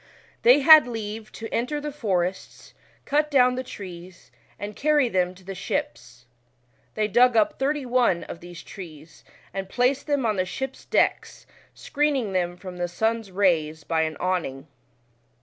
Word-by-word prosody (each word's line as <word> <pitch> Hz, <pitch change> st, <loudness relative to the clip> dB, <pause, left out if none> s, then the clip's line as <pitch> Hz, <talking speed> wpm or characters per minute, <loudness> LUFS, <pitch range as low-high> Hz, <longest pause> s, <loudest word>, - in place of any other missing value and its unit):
They 250 Hz, +5 st, +6 dB
had 310 Hz, -2 st, +9 dB
leave 220 Hz, -2 st, -6 dB
to 225 Hz, -, -7 dB
enter 250 Hz, +6 st, -1 dB
the 295 Hz, 0 st, -5 dB
forests, 190 Hz, -9 st, -3 dB, 0.3 s
cut 300 Hz, +1 st, +1 dB
down 250 Hz, -3 st, +4 dB
the 255 Hz, +1 st, -3 dB
trees, 180 Hz, -, -11 dB, 0.3 s
and 205 Hz, +1 st, -6 dB
carry 295 Hz, -3 st, +2 dB
them 180 Hz, -3 st, 0 dB
to 185 Hz, -, -18 dB
the 195 Hz, +1 st, -6 dB
ships. 125 Hz, -9 st, -5 dB, 0.7 s
They 215 Hz, -1 st, +1 dB
dug 240 Hz, +2 st, +4 dB
up 215 Hz, -, +2 dB
thirty 280 Hz, +1 st, 0 dB
one 245 Hz, -8 st, +2 dB
of -, -, -8 dB
these 175 Hz, -1 st, -11 dB
trees, 160 Hz, -5 st, -12 dB, 0.3 s
and 190 Hz, -1 st, -5 dB
placed 255 Hz, +6 st, +1 dB
them 285 Hz, -4 st, 0 dB
on 215 Hz, -3 st, 0 dB
the 185 Hz, -, +1 dB
ships' 265 Hz, +7 st, -6 dB
decks, -, -, 0 dB, 0.3 s
screening 280 Hz, -8 st, -1 dB
them 175 Hz, -1 st, -1 dB
from 180 Hz, -1 st, -9 dB
the 175 Hz, 0 st, -1 dB
sun's 220 Hz, +4 st, -1 dB
rays 165 Hz, -5 st, +1 dB
by 160 Hz, +1 st, 0 dB
an 155 Hz, -2 st, -2 dB
awning. 165 Hz, -7 st, -2 dB
205 Hz, 160 wpm, -24 LUFS, 175-255 Hz, 0.7 s, had